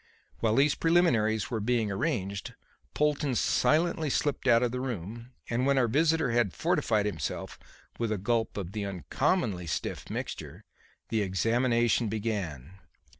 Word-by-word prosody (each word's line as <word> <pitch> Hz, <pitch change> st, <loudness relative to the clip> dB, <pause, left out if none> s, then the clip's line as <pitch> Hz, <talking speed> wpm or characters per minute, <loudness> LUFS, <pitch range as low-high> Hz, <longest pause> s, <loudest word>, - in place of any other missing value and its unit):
While 110 Hz, -1 st, +2 dB
these 140 Hz, +2 st, +4 dB
preliminaries 125 Hz, -, +2 dB
were 115 Hz, -, -1 dB
being 110 Hz, -1 st, 0 dB
arranged, 100 Hz, -, -2 dB, 0.4 s
Polton 150 Hz, -3 st, +1 dB
silently 160 Hz, +4 st, +2 dB
slipped 140 Hz, 0 st, -1 dB
out 120 Hz, -1 st, +5 dB
of 120 Hz, -, +1 dB
the 125 Hz, -, -3 dB
room, 115 Hz, -1 st, -5 dB, 0.2 s
and 125 Hz, +3 st, 0 dB
when 140 Hz, -1 st, +3 dB
our 125 Hz, -2 st, +3 dB
visitor 155 Hz, +2 st, +2 dB
had 115 Hz, -5 st, +1 dB
fortified 150 Hz, -, +1 dB
himself 105 Hz, -, -4 dB, 0.4 s
with 115 Hz, -2 st, -1 dB
a 110 Hz, -, 0 dB
gulp 110 Hz, +3 st, -1 dB
of 95 Hz, -3 st, -4 dB
the 105 Hz, 0 st, -3 dB
uncommonly 100 Hz, -, -1 dB
stiff 75 Hz, -, -4 dB
mixture, -, -, -6 dB, 0.5 s
the 110 Hz, -2 st, +1 dB
examination 115 Hz, +4 st, +2 dB
began. 95 Hz, -, -4 dB
115 Hz, 140 wpm, -29 LUFS, 105-135 Hz, 0.5 s, out